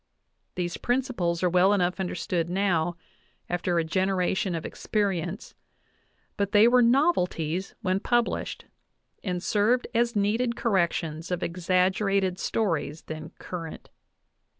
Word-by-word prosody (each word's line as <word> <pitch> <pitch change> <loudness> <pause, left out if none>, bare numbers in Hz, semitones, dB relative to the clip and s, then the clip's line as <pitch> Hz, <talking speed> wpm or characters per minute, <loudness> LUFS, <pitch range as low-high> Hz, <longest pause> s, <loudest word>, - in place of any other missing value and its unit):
These 175 -1 -2
principles 240 -10 -1
are 180 - +4
well 185 +3 +5
enough 180 -1 +1
understood 180 -2 -2
now, 175 -3 +1 0.5
after 175 0 -1
a 165 - +3
generation 185 +1 0
of 165 - -4
experience; 195 -2 -2 0.8
but 200 -1 -1
they 210 +2 +7
were 250 +1 +5
novelties 195 - +1
when 185 0 +1
published, 240 +2 -1 0.6
and 180 -3 -2
served 220 +4 +2
as 235 0 +1
needed 225 +4 +1
corrections 170 -7 0
of 180 -1 -2
exaggerated 185 +2 +1
stories 165 -7 -1
then 155 0 -7
current. 165 -3 -7
185 Hz, 115 wpm, -27 LUFS, 175-210 Hz, 0.8 s, they